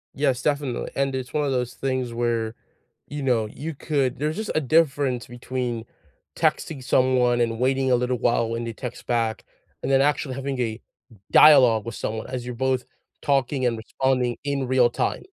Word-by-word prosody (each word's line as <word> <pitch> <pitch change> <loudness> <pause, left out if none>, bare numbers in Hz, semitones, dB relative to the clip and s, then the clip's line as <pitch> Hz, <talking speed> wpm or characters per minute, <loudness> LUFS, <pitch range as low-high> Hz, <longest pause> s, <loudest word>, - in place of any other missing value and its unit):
Yes, 135 -3 +1
definitely, 145 -4 -1
and 135 -1 0
it's 130 -1 -5
one 150 -1 +1
of 140 - 0
those 125 -1 -1
things 130 -3 -2
where, 115 -2 -1 0.5
you 145 0 -5
know, 120 -4 +2
you 150 +9 -6
could 140 -3 -1
there's 150 +2 -1
just 215 +1 -3
a - - +2
difference 140 -4 +1
between 120 -1 -4 0.5
texting 140 -5 0
someone 125 -1 +3
and 115 -1 0
waiting 130 +1 +1
a - - +6
little 125 +1 0
while 115 0 +1
when 115 +1 -3
they 115 - -4
text 125 +2 -8
back, 115 -2 -1 0.4
and - - -3
then 135 0 +5
actually 140 -2 0
having 135 0 -3
a 115 -2 -2 0.5
dialogue 125 -8 +7
with 115 -2 -5
someone 110 0 -4
as 125 -1 -5
you're 125 0 -5
both 130 0 0 0.4
talking 135 -1 +1
and 120 -2 +1
responding 125 +1 0
in 140 -2 -1
real 125 -1 +4
time. - - -2
130 Hz, 180 wpm, -24 LUFS, 120-135 Hz, 0.5 s, dialogue